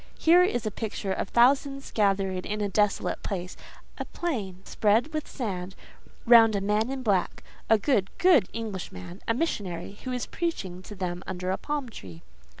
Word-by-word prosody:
Here 340 +2 +6
is 245 -11 +1
a 215 - -1
picture 205 -2 -3
of 190 - -3
thousands 275 +3 +3
gathered 195 -3 +1
in 210 0 -2
a 205 - 0
desolate 205 0 0
place—a 180 -2 -7
plain, 200 - -4
spread 225 +9 +1
with 310 -1 -3
sand—round 220 +2 +1
a - - +1
man 210 +4 +1
in 265 -1 -4
black,—a 205 +2 0
good, 205 -3 +1
good 345 - +5
Englishman—a 190 - -5
missionary, 200 - -3
who 255 - -4
is 250 -1 -2
preaching 195 - -4
to 205 +3 -10
them 180 -2 -4
under 185 0 -3
a 190 - 0
palm 295 -3 -3
tree." 90 - -11
210 Hz, 150 wpm, -27 LUFS, 190-250 Hz, -, Here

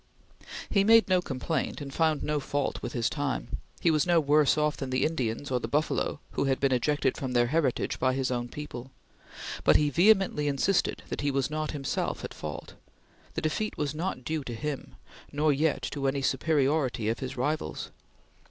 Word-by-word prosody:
He 200 - +3
made 225 +2 +6
no 185 -1 +3
complaint 145 +1 -2
and 140 -2 -7
found 160 -2 +1
no 150 0 0
fault 145 0 -2
with - - -5
his 120 -3 +1
time; 145 -3 -2 0.2
he 170 - +4
was 155 -2 +3
no 175 -1 +5
worse 150 0 +4
off 150 0 +1
than 135 - -5
the 130 0 +1
Indians 130 -3 -2
or 125 - +2
the 115 - -4
buffalo 150 +2 0
who - - 0
had 135 -1 +1
been 140 -1 +2
ejected 135 +1 +1
from 130 -2 -3
their 120 -1 +4
heritage 155 -6 0
by 130 0 +2
his 130 -1 -1
own 120 -1 -2
people; 135 -3 -7 0.7
but - - +5
he 150 -1 +4
vehemently 190 -3 +4
insisted 145 +7 +1
that - - -3
he 145 - +1
was 135 +1 0
not 155 0 -2
himself 140 -3 -2
at - - -7
fault. 75 -1 -7 0.6
The - - -1
defeat 185 +8 -2
was 145 -1 -1
not 160 -5 -3
due 155 0 -2
to 120 - -5
him, 140 +4 -5 0.4
nor 150 +1 +2
yet 145 -2 +1
to 140 -2 -1
any 135 0 0
superiority 135 -4 +1
of 115 - 0
his 130 0 -5
rivals. 150 +5 -2
145 Hz, 190 wpm, -28 LUFS, 130-155 Hz, 0.7 s, made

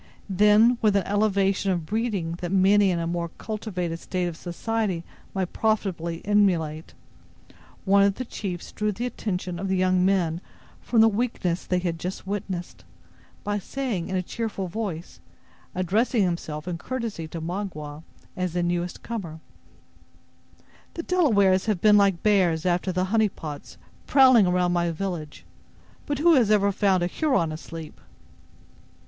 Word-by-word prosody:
Then, 210 +5 +5
with 210 -3 +3
an 195 -3 +2
elevation 200 -1 +1
of 175 -4 -1
breeding 210 -4 -1
that 175 -1 -3
many 195 +1 +4
in 175 - 0
a 170 - -2
more 170 0 -2
cultivated 180 -6 -4
state 180 0 -2
of 175 -2 -3
society 185 +1 -2 0.3
might 190 -2 -2
profitably 185 -6 -1
emulate, 175 -7 +1 0.9
one 200 0 +5
of 200 0 +3
the 255 - -5
chiefs 185 -6 -6
drew 210 0 -1
the 230 +5 -4
attention 180 -7 -4
of 195 - -3
the 190 0 0
young 185 0 +2
men 180 -3 +1 0.4
from 230 -2 +3
the 225 - +7
weakness 205 -6 -1
they 180 - +1
had 175 -2 -2
just 180 +2 -5
witnessed, 190 -3 -5 0.6
by 205 0 -1
saying, 225 -6 -3
in 190 - -2
a 185 - 0
cheerful 210 -2 -4
voice, 180 -3 -5 0.6
addressing 205 +5 +1
himself 170 -3 -3
in 170 -2 -3
courtesy 230 -10 -4
to 165 +1 -6
Magua, 160 -4 -5 0.3
as 180 -2 -2
the 175 0 0
newest 175 0 -2
comer: 180 -9 -5 1.6
"The 335 - -4
Delawares 205 - +3
have 210 -5 +1
been 210 +2 +6
like 195 -4 +3
bears 185 -6 +3
after 180 +1 +1
the 185 0 0
honey 220 -2 +4
pots, 150 -5 -9 0.3
prowling 255 -7 +6
around 180 0 +2
my 170 -1 +1
village. 165 -3 -5 0.6
But 290 - -1
who 335 +4 +5
has 245 -8 +4
ever 200 -1 +4
found 190 -2 +2
a - - +2
Huron 180 - 0
asleep?" 160 0 -9
190 Hz, 155 wpm, -25 LUFS, 175-210 Hz, 1.6 s, the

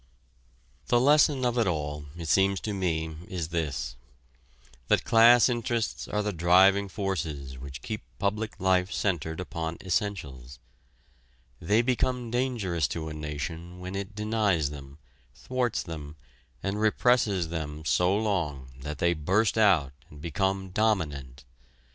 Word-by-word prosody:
The 120 - +4
lesson 145 0 +4
of 120 0 +1
it 115 - +2
all, 75 -3 -2
it 85 -1 -6
seems 95 +3 +3
to 105 - -3
me, 80 -4 -2
is 85 -4 -4
this: 75 -7 -3 0.9
that - - +3
class 115 0 +7
interests 120 -2 -2
are 105 0 -1
the 105 0 -2
driving 95 +4 +4
forces 80 - -4
which 70 +1 -8
keep 110 -1 -4 0.2
public 105 +2 -2
life 95 0 +2
centered 80 -4 -1
upon 85 -2 -4
essentials. 70 - -3 1.0
They 105 +8 +3
become 125 -1 0
dangerous 115 - 0
to 80 +2 -4
a - - -6
nation 75 +4 -6
when 90 +1 -6
it 100 +1 -5
denies 105 -8 +1
them, 70 -1 -10 0.4
thwarts 125 -2 -1
them 75 -3 -8 0.5
and 100 +2 -2
represses 110 -5 +2
them 80 -2 -5
so 90 +5 +3
long 80 -12 -2
that 75 +2 -6
they 85 +2 +2
burst 95 +7 +1
out 90 -11 +3 0.2
and 75 - -13
become 95 +4 -1
dominant. 75 - -1
90 Hz, 135 wpm, -28 LUFS, 75-105 Hz, 1.0 s, class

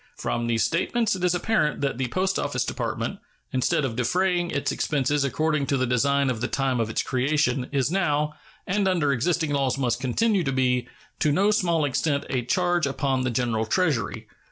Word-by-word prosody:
From 120 0 -2
these 115 -1 +1
statements 195 - +1
it 180 - -6
is 180 -1 +2
apparent 175 -5 0
that 140 -3 -1
the 130 - 0
Post 190 +8 0
Office - - -1
Department, - - -3 0.3
instead 130 +2 +1
of 120 -4 -3
defraying 175 +7 +1
its 145 -3 -1
expenses 145 0 0
according 150 +1 0
to 140 - +1
the 130 - +1
design 135 +2 +2
at 115 -3 -5
the 120 - 0
time 135 -3 0
of 115 -1 0
its 110 - -1
creation, 130 -1 0
is 140 0 0
now, 150 -5 +1 0.3
and 200 +1 0
under 170 -6 +2
existing 155 +3 0
laws 135 -2 +1
must 125 -4 0
continue 190 - +1
to 135 - -1
be, 125 -2 +1 0.3
to 150 - +2
no 195 +8 +3
small 170 -8 +1
extent 140 +1 0
a 125 -3 0
charge 175 +4 +1
upon 135 -1 -1
the 130 - 0
general 115 -2 -1
Treasury. 145 - 0
140 Hz, 190 wpm, -25 LUFS, 125-175 Hz, 0.3 s, no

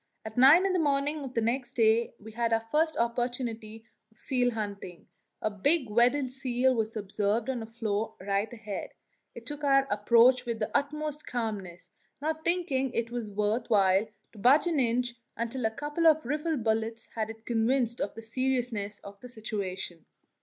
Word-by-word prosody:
At 220 0 -7
nine 285 +9 +7
in 385 - +1
the 365 - +2
morning 290 0 0
of 260 -1 -8
the 230 - +2
next 245 +2 -1
day 230 0 +2
we 220 +1 -11
had 230 +1 -1
our 225 0 +1
first 315 +1 +2
opportunity 235 -2 -2 0.3
of 220 - -29
seal 250 -1 +1
hunting; 200 -5 -6 0.4
a 215 - +1
big 260 - +1
Weddell 250 +5 +3
seal 255 0 +1
was 225 -1 -2
observed 210 +4 -1
on 245 -3 -4
a 225 - -7
floe 220 -1 -3
right 200 +2 -1
ahead. 215 -4 -6 0.4
It 235 - -10
took 295 +3 -6
our 275 -1 +4
approach 235 +4 +5
with 235 -2 -3
the 215 - -4
utmost 300 +1 -2
calmness, 205 -7 -4 0.3
not 315 +2 -2
thinking 335 -7 0
it 230 0 -2
worth 215 0 -1
while 195 -1 +4 0.2
to - - -17
budge 260 - +5
an 335 -4 +1
inch 245 0 +1 0.2
until 235 +1 -2
a - - +3
couple 295 +7 0
of 315 -3 +4
rifle 300 +4 -1
bullets 225 0 -1
had 225 0 -5
convinced 235 +1 +1
it - - +1
of 200 - -13
the 225 - -8
seriousness 235 -4 -1
of 200 0 -11
the 250 - -10
situation. 195 -7 -5
235 Hz, 175 wpm, -29 LUFS, 220-265 Hz, 0.4 s, nine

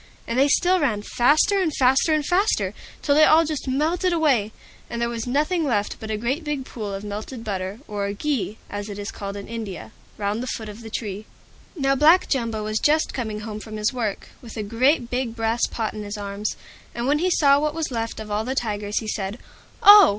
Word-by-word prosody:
And 235 +2 -1
they 275 - +5
still 360 +5 +3
ran 215 -9 0
faster 310 - +3
and 340 -4 +1
faster 265 +4 +4
and 305 -2 +2
faster, 390 +5 +1 0.3
till 285 - +3
they 305 +2 +6
all 320 +1 +6
just 305 -3 -4
melted 325 +7 +1
away, 275 -11 +2 0.4
and 235 - -4
there 235 - +1
was 235 0 -4
nothing 305 +7 +1
left 210 -8 0
but 220 - -7
a 215 - -1
great 260 +9 -1
big 295 -3 -3
pool 215 -6 -6
of 195 +1 -5
melted 215 +4 -6
butter 195 +1 -4
(or 200 -1 -2
"ghi," 220 -1 -2
as 205 +1 -5
it 200 - -6
is 205 +1 -5
called 200 0 -6
in 200 - -8
India) 200 - -6 0.3
round 205 +2 -1
the 255 - -4
foot 220 -2 -4
of 210 +2 -10
the 225 - -8
tree. 210 -2 -4 0.5
Now 275 -2 +2
Black 310 +7 +5
Jumbo 230 -5 -1
was 215 0 -1
just 310 +1 +2
coming 220 -4 -3
home 215 -1 -6
from 215 0 -7
his 215 +4 0
work, 225 -5 -3
with 235 -2 -10
a 215 - -2
great 240 +5 +2
big 250 -2 -2
brass 225 +1 +1
pot 220 -2 -3
in 215 - -6
his 205 0 -5
arms, 205 +1 -3 0.4
and 235 - -2
when 290 +3 +2
he 365 +3 +2
saw 285 -5 +5
what 300 +1 -1
was 325 -4 -2
left 230 -2 -3
of 215 -1 -7
all 210 +1 0
the 260 +3 -3
Tigers 210 -3 -1
he 220 - -7
said, 205 0 -3 0.5
"Oh! 410 -1 +10
230 Hz, 225 wpm, -23 LUFS, 210-290 Hz, 0.5 s, Oh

